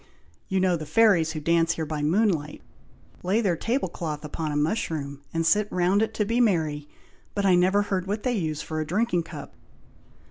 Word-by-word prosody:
You 190 -1 0
know 185 -2 +2
the 155 -1 -7
fairies 170 -3 +4
who 155 - -4
dance 165 +1 +2
here 160 - -3
by 150 -1 -4
moonlight, 160 -2 0 0.6
lay 190 +5 +1
their 195 -7 +1
table 235 - -1
cloth 155 -3 -5
upon 155 +1 -4
a - - -3
mushroom, 150 -3 -2
and 165 0 -1
sit 205 +5 +3
round 185 +3 +2
it, 220 0 0
to 210 - 0
be 230 +4 +1
merry, 155 -9 +1 0.5
but 200 -1 0
I 190 - +5
never 185 +3 +3
heard 190 -2 -2
what 210 +2 -3
they 250 - +1
use 160 -8 -2
for 155 -1 -4
a 155 - -3
drinking 185 0 +1
cup." 165 - -9
175 Hz, 200 wpm, -25 LUFS, 155-205 Hz, 0.6 s, I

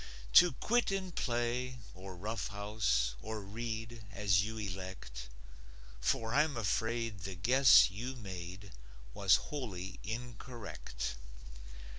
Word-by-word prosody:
To 175 -4 +8
quit 240 - +1
and 190 -2 -2
play, 125 0 -1 0.2
or 95 0 -9
roughhouse, 105 - 0
Or 110 0 -4
read, 115 +2 -5
as 100 -3 +3
you 110 +1 -4
elect; 95 - -6 0.7
For 115 - 0
I'm 150 -1 +3
afraid 115 0 0
the 95 +1 -5
guess 125 +4 +7
you 120 +7 -5
made 95 -3 -8 0.4
Was 100 -3 +5
wholly 100 -10 -4
incorrect. 110 - -6
110 Hz, 105 wpm, -34 LUFS, 95-120 Hz, 0.7 s, To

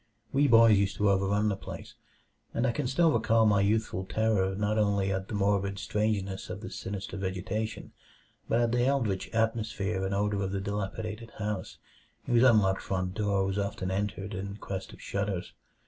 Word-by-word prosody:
We 145 +1 +4
boys 115 -4 +7
used 100 -2 0
to 105 -1 +3
overrun 100 +2 +2
the 100 - 0
place, - - -9 0.6
and 120 - +1
I 125 - +3
can 140 +2 -2
still 160 +6 +3
recall 115 -5 +3
my 100 -2 +4
youthful 105 -2 0
terror 95 -2 +1
not 105 +2 0
only 100 -2 +2
at 95 0 -2
the - - -4
morbid 100 -1 +1
strangeness 100 -1 -1
of 100 - -6
this - - -7
sinister 100 0 -5
vegetation, 100 +4 -3 0.6
but 115 - +3
at 120 -1 +2
the 120 0 +2
eldritch 125 -8 0
atmosphere 110 -3 -1
and 95 +1 -1
odor 100 0 0
of 95 0 -2
the 100 - -1
dilapidated 105 +3 -4
house, 105 -3 -4 0.5
whose 120 -1 +3
unlocked 105 -7 +4
front 90 -1 -2
door 100 -1 +1
was 95 +1 -1
often 100 -2 -2
entered 100 +1 -3
in 100 +1 -5
quest 95 -2 -6
of - - -13
shudders. 100 -3 -3
100 Hz, 180 wpm, -29 LUFS, 95-110 Hz, 0.6 s, boys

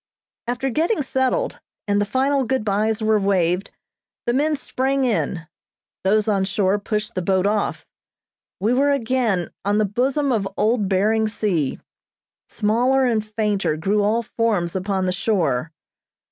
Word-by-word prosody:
After 250 +2 -1
getting 325 - +1
settled, 265 - -1 0.3
and 205 0 +2
the - - +1
final 270 +4 +1
good 255 -2 -1
byes 215 +2 0
were 215 0 +3
waved, 185 -2 +1 0.6
the 240 - +1
men 300 +4 +2
sprang 270 0 -1
in, 195 -7 -1 0.6
those 210 +3 +2
on 200 -3 +2
shore 195 +1 +1
pushed 215 +2 -3
the 185 - -2
boat 190 +1 +1
off; 210 0 -1 0.7
we 215 +6 +1
were 275 +3 +3
again 240 -8 0
on 205 +2 +1
the 215 - +3
bosom 265 +7 0
of 205 -5 0
old 215 -2 +1
Behring 215 +3 +2
Sea. 195 -10 -1 0.7
Smaller 250 +5 +2
and 225 -4 +1
fainter 210 -6 -1
grew 200 +6 +1
all 220 +3 +1
forms 210 -7 -1
upon 190 0 -1
the 185 - 0
shore. 175 - 0
215 Hz, 145 wpm, -22 LUFS, 195-250 Hz, 0.7 s, were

